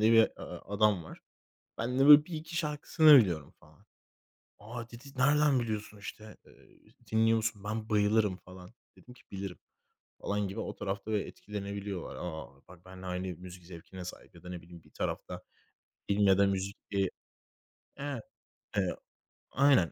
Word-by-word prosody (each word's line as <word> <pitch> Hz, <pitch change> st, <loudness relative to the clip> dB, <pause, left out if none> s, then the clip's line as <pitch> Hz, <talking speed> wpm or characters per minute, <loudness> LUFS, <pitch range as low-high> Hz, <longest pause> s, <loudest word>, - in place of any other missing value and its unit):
diye 110 Hz, +1 st, +5 dB
bir 115 Hz, -1 st, +7 dB, 0.4 s
adam 100 Hz, -4 st, +3 dB
var. -, -, -11 dB, 0.6 s
Ben 125 Hz, +3 st, -1 dB
de 135 Hz, -, +5 dB
böyle 150 Hz, 0 st, +10 dB
1-2 160 Hz, -1 st, -6 dB
şarkısını 150 Hz, -1 st, +6 dB
biliyorum 85 Hz, -, +1 dB
falan. 75 Hz, 0 st, -22 dB, 0.7 s
"A!" 115 Hz, +2 st, -8 dB
dedi, 120 Hz, +4 st, -11 dB
"Nereden 145 Hz, 0 st, +4 dB
biliyorsun, 105 Hz, -2 st, -4 dB
işte? 105 Hz, +1 st, -9 dB
Eee, -, -, -22 dB, 0.2 s
dinliyor 110 Hz, +1 st, +4 dB
musun? 110 Hz, -2 st, -2 dB
Ben 110 Hz, +1 st, -3 dB
bayılırım." 105 Hz, -2 st, +3 dB
falan. 90 Hz, -1 st, -13 dB, 0.3 s
Dedim 125 Hz, -, -15 dB
ki, -, -, -20 dB
"Bilirim." 95 Hz, -2 st, -5 dB, 0.6 s
falan 105 Hz, 0 st, -1 dB
gibi. 100 Hz, +4 st, -6 dB
O 100 Hz, -, -4 dB
tarafta 100 Hz, +2 st, -4 dB
da 105 Hz, -, +3 dB
etkilenebiliyorlar. 100 Hz, -2 st, -5 dB
A, 80 Hz, -3 st, -5 dB, 0.2 s
bak 90 Hz, 0 st, -16 dB
benle 95 Hz, 0 st, -10 dB
aynı 90 Hz, +1 st, -3 dB
müzik 90 Hz, 0 st, -11 dB
zevkine 90 Hz, +1 st, -9 dB
sahip 90 Hz, -, -10 dB
ya -, -, -15 dB
da 90 Hz, -, -9 dB
ne 90 Hz, -1 st, -6 dB
bileyim 85 Hz, 0 st, -14 dB
bir -, -, -22 dB
tarafta -, -, -4 dB, 0.7 s
film 100 Hz, 0 st, +3 dB
ya 95 Hz, -, +6 dB
da 100 Hz, 0 st, +5 dB
müzik 100 Hz, +1 st, -2 dB
diye 100 Hz, -2 st, +1 dB, 0.9 s
Evet. 140 Hz, -4 st, -4 dB, 0.6 s
Eee, -, -, +1 dB, 0.6 s
aynen. 135 Hz, -, +4 dB
105 Hz, 155 wpm, -31 LUFS, 95-115 Hz, 0.9 s, böyle